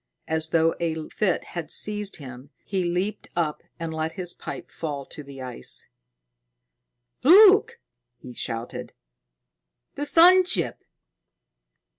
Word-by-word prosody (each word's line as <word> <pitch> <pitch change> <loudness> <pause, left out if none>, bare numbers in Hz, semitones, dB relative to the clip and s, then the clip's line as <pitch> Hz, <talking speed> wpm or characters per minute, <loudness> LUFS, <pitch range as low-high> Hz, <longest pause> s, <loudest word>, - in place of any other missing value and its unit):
As 160 0 -1
though 165 0 +3
a 165 -2 -1
fit 195 -5 0
had 170 -3 -5
seized 210 -1 -2
him, 130 -1 -10 0.2
he 190 -2 -1
leaped 180 +4 -2
up 160 -3 -1 0.2
and 165 -1 -4
let 160 0 -3
his 180 -3 -2
pipe - - -8
fall 145 -4 -5
to - - -10
the 140 -2 -10
ice. 125 - -4 1.3
"Look!" 415 - +7 0.4
he 125 +1 -11
shouted. 115 0 -5 1.0
"The 290 +1 -4
sun 360 +4 +7
ship!" 185 - 0
170 Hz, 120 wpm, -25 LUFS, 150-210 Hz, 1.3 s, Look